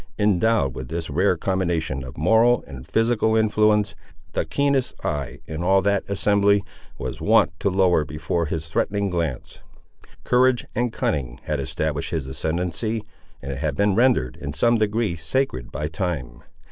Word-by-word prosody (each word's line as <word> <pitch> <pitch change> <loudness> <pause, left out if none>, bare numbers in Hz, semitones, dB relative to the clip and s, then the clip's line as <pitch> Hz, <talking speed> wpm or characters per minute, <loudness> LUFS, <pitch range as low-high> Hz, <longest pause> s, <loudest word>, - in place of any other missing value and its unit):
Endowed 105 - +2
with 65 0 -6
this 80 0 -4
rare 90 +4 +2
combination 85 -7 -1
of 65 -1 -9
moral 110 - +4
and 65 -1 -10
physical 110 -1 +2
influence, 105 -1 +3 0.4
the - - 0
keenest 135 - 0
eye 75 -4 -3
in 80 +1 -5
all 95 +2 +4
that 100 0 +1
assembly 100 0 +3 0.3
was - - -5
wont - - +4
to 100 - +1
lower 90 -4 +3
before 80 +2 -2
his 80 +1 -3
threatening 100 +4 -1
glance. 80 -8 -3 0.6
Courage 125 0 +3
and 120 0 0
cunning 65 - -2
had 75 -2 -2
established 75 +2 -2
his 80 -5 -2
ascendency, 90 - -2 0.4
and 70 - -4
it 70 - -5
had 75 -1 -1
been 100 +4 +2
rendered, 115 - +2
in 70 -1 -5
some 120 +7 +3
degree, 110 -3 0
sacred 80 - -2
by 75 - -3
time. 75 -8 -4
90 Hz, 155 wpm, -23 LUFS, 75-110 Hz, 0.6 s, moral